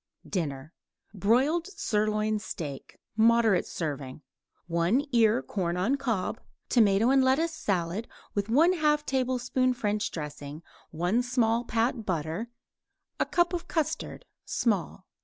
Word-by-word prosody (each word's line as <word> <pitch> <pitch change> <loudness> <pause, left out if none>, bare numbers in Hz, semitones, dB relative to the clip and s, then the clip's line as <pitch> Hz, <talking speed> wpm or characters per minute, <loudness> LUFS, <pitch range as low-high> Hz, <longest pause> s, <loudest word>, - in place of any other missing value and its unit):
DINNER 155 -4 -3 0.4
Broiled 255 - +2
sirloin 215 - 0
steak, 150 -9 -7 0.2
moderate 225 -3 +4
serving; 145 -3 -5 0.4
1 175 +11 +1
ear 220 - +4
corn 175 +3 -2
on 210 +10 +2
cob; 235 -9 -2 0.3
tomato 220 0 +4
and 270 -1 +5
lettuce 305 +6 +2
salad, 190 - -2 0.3
with 205 0 -1
1/2 300 +2 +3
tablespoon 255 -1 0
French 210 -3 -1
dressing; 150 0 -7 0.3
1 175 +9 0
small 240 -2 +1
pat 230 +1 0
butter; 170 +4 -3 0.8
cup 345 0 +2
custard 320 +8 -2 0.2
(small). 200 -4 -1
220 Hz, 105 wpm, -28 LUFS, 180-255 Hz, 0.8 s, and